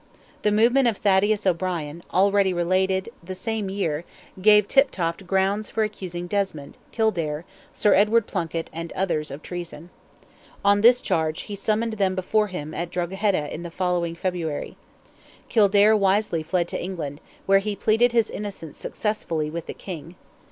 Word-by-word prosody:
The 210 Hz, -, +2 dB
movement 240 Hz, +5 st, +4 dB
of 225 Hz, -4 st, +1 dB
Thaddeus 205 Hz, +1 st, +2 dB
O'Brien, 170 Hz, -3 st, -1 dB
already 195 Hz, 0 st, +3 dB
related, 185 Hz, +2 st, +1 dB
the 185 Hz, +2 st, -6 dB
same 220 Hz, 0 st, -3 dB
year, 170 Hz, -6 st, -2 dB, 0.4 s
gave 210 Hz, 0 st, +6 dB
Tiptoft 185 Hz, -10 st, +1 dB
grounds 195 Hz, +3 st, +1 dB
for 220 Hz, -, 0 dB
accusing 185 Hz, -5 st, -4 dB
Desmond, 175 Hz, -7 st, -3 dB, 0.2 s
Kildare, 170 Hz, -9 st, -1 dB, 0.3 s
Sir 210 Hz, -, +3 dB
Edward 210 Hz, +2 st, +4 dB
Plunkett, 165 Hz, -2 st, -3 dB
and 165 Hz, +1 st, -6 dB
others, 165 Hz, -5 st, -1 dB
of 140 Hz, +3 st, -8 dB
treason. 175 Hz, -1 st, -7 dB, 0.7 s
On 205 Hz, 0 st, +5 dB
this 245 Hz, +3 st, +6 dB
charge 160 Hz, 0 st, 0 dB
he 205 Hz, -, -7 dB
summoned 220 Hz, +3 st, 0 dB
them 190 Hz, -1 st, +2 dB
before 210 Hz, +3 st, +1 dB
him 155 Hz, -5 st, -6 dB
at 170 Hz, +1 st, -3 dB
Drogheda 180 Hz, -2 st, -1 dB
in 160 Hz, -, -6 dB
the 170 Hz, -, -6 dB
following 175 Hz, -1 st, -1 dB
February. 170 Hz, -4 st, -3 dB, 0.7 s
Kildare 210 Hz, 0 st, +5 dB
wisely 195 Hz, -4 st, +2 dB
fled 175 Hz, +2 st, 0 dB
to -, -, -4 dB
England, 160 Hz, -6 st, -5 dB, 0.2 s
where 195 Hz, 0 st, +5 dB
he 205 Hz, +1 st, -3 dB
pleaded 225 Hz, +4 st, +3 dB
his 230 Hz, -2 st, +2 dB
innocence 195 Hz, -7 st, -7 dB
successfully 165 Hz, -8 st, -2 dB
with 170 Hz, +1 st, -5 dB
the -, -, -5 dB
King. 175 Hz, -2 st, -8 dB
190 Hz, 150 wpm, -24 LUFS, 170-210 Hz, 0.7 s, gave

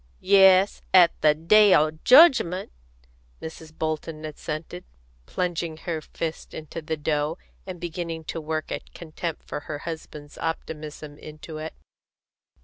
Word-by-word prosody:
"Yes, 190 Hz, 0 st, +6 dB
at 175 Hz, -3 st, +8 dB
the 150 Hz, -1 st, +5 dB
day 200 Hz, +6 st, +5 dB
o' 155 Hz, +1 st, +3 dB
jedgment," 220 Hz, -, +5 dB, 0.7 s
Mrs. 160 Hz, 0 st, -9 dB
Bolton 155 Hz, 0 st, -4 dB
assented, 155 Hz, -, -6 dB, 0.4 s
plunging 170 Hz, -3 st, -3 dB
her 160 Hz, -1 st, -4 dB
fists 160 Hz, +1 st, -6 dB
into 160 Hz, +1 st, -7 dB
the 155 Hz, 0 st, -3 dB
dough, 150 Hz, +2 st, -1 dB, 0.3 s
and 180 Hz, -2 st, -7 dB
beginning 165 Hz, -1 st, -5 dB
to 165 Hz, -, -5 dB
work 155 Hz, 0 st, -4 dB
a -, -, -2 dB, 0.2 s
contempt 165 Hz, 0 st, -6 dB
for -, -, -5 dB
her 145 Hz, 0 st, -6 dB
husband's 150 Hz, -2 st, -8 dB
optimism 155 Hz, -2 st, -6 dB
into 155 Hz, +1 st, -9 dB
it. 160 Hz, +1 st, -7 dB
160 Hz, 130 wpm, -25 LUFS, 155-170 Hz, 0.7 s, at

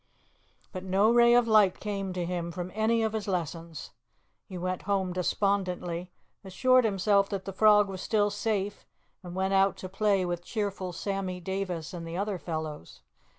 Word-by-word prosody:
But 185 Hz, -1 st, -6 dB
no 195 Hz, +4 st, +3 dB
ray 240 Hz, 0 st, +6 dB
of 240 Hz, -1 st, +4 dB
light 210 Hz, -4 st, +4 dB
came 200 Hz, -2 st, -3 dB
to 180 Hz, -1 st, -2 dB
him 170 Hz, -1 st, -3 dB
from 180 Hz, +1 st, -5 dB
any 225 Hz, +2 st, +1 dB
of 220 Hz, -1 st, -1 dB
his 215 Hz, -2 st, -3 dB
lessons. 165 Hz, -3 st, -4 dB, 0.6 s
He 185 Hz, -, -7 dB
went 185 Hz, +1 st, -3 dB
home 190 Hz, -2 st, 0 dB
despondently, 180 Hz, -2 st, -1 dB, 0.3 s
assured 255 Hz, +6 st, +3 dB
himself 200 Hz, -1 st, +2 dB
that 195 Hz, -2 st, -4 dB
the 195 Hz, -, -5 dB
frog 210 Hz, +1 st, +5 dB
was 190 Hz, -1 st, -6 dB
still 210 Hz, -2 st, +1 dB
safe, 205 Hz, -1 st, -2 dB, 0.3 s
and 175 Hz, -2 st, -9 dB
went 190 Hz, +1 st, 0 dB
out 195 Hz, 0 st, +3 dB
to 185 Hz, -, -7 dB
play 195 Hz, -1 st, +1 dB
with 175 Hz, -1 st, -3 dB
cheerful 200 Hz, -4 st, -3 dB
Sammy 190 Hz, 0 st, -3 dB
Davis 185 Hz, -3 st, -4 dB
and 170 Hz, -2 st, -6 dB
the 165 Hz, +1 st, -5 dB
other 200 Hz, -1 st, -2 dB
fellows. 155 Hz, -, -6 dB
190 Hz, 170 wpm, -28 LUFS, 180-205 Hz, 0.6 s, ray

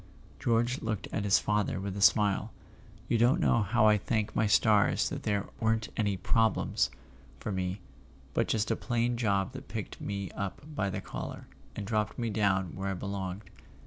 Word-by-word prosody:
George 120 Hz, +2 st, +1 dB
looked 110 Hz, -3 st, -3 dB
at 100 Hz, -, -2 dB
his 100 Hz, 0 st, +5 dB
father 105 Hz, -3 st, 0 dB
with 95 Hz, 0 st, -4 dB
a 100 Hz, -, -4 dB
smile. 105 Hz, +2 st, +4 dB, 0.6 s
"You 115 Hz, -, +2 dB
don't 120 Hz, +3 st, +4 dB
know 115 Hz, -, +3 dB
how 110 Hz, +2 st, +2 dB
I 105 Hz, -1 st, +5 dB
thank 105 Hz, +1 st, -1 dB
my 110 Hz, -, +2 dB
stars 105 Hz, -1 st, +4 dB
that -, -, -5 dB
there 100 Hz, -2 st, 0 dB
weren't 110 Hz, -1 st, +1 dB
any 100 Hz, -3 st, 0 dB
'problems' 110 Hz, +4 st, +2 dB, 0.5 s
for 105 Hz, -, -4 dB
me, 95 Hz, 0 st, -2 dB, 0.5 s
but -, -, +1 dB
just 110 Hz, 0 st, 0 dB
a -, -, +2 dB
plain 120 Hz, 0 st, 0 dB
job 100 Hz, -5 st, +1 dB
that -, -, -9 dB
picked -, -, -6 dB
me 100 Hz, -1 st, -4 dB
up 100 Hz, +7 st, -5 dB
by 105 Hz, -9 st, 0 dB
the 95 Hz, -, -4 dB
collar, -, -, -6 dB, 0.3 s
and 105 Hz, -, -4 dB
dropped 105 Hz, 0 st, -1 dB
me 115 Hz, -3 st, -1 dB
down 95 Hz, -4 st, +1 dB
where 95 Hz, +1 st, -3 dB
I -, -, -1 dB
belonged." 95 Hz, +1 st, -4 dB
105 Hz, 180 wpm, -30 LUFS, 100-110 Hz, 0.6 s, his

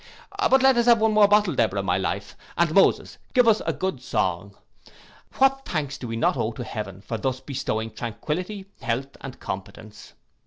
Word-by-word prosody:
But 265 Hz, 0 st, +4 dB
let 265 Hz, -2 st, +5 dB
us 235 Hz, 0 st, +2 dB
have 235 Hz, -2 st, +6 dB
one 220 Hz, 0 st, +2 dB
bottle 210 Hz, -2 st, +5 dB
more, -, -, -5 dB
Deborah, 100 Hz, -4 st, +1 dB
my 95 Hz, 0 st, +1 dB
life, 95 Hz, -, -3 dB, 0.2 s
and 170 Hz, -2 st, +2 dB
Moses 195 Hz, -, +3 dB, 0.2 s
give 250 Hz, -2 st, +5 dB
us 220 Hz, -1 st, +4 dB
a -, -, +3 dB
good 185 Hz, -9 st, -3 dB
song. 95 Hz, -4 st, -2 dB, 0.8 s
What 270 Hz, 0 st, +3 dB
thanks 145 Hz, -, -3 dB
do 125 Hz, -, -6 dB
we 115 Hz, -, -4 dB
not 115 Hz, -, +1 dB
owe 110 Hz, -, -1 dB
to 120 Hz, -, -6 dB
heaven 100 Hz, -5 st, -6 dB
for 115 Hz, +2 st, -5 dB
thus 130 Hz, +3 st, -2 dB
bestowing 115 Hz, -5 st, -3 dB
tranquillity, 180 Hz, -, -4 dB, 0.2 s
health, 130 Hz, +3 st, -3 dB
and 135 Hz, -1 st, -9 dB
competence. 100 Hz, +2 st, -8 dB
135 Hz, 185 wpm, -24 LUFS, -, 0.8 s, have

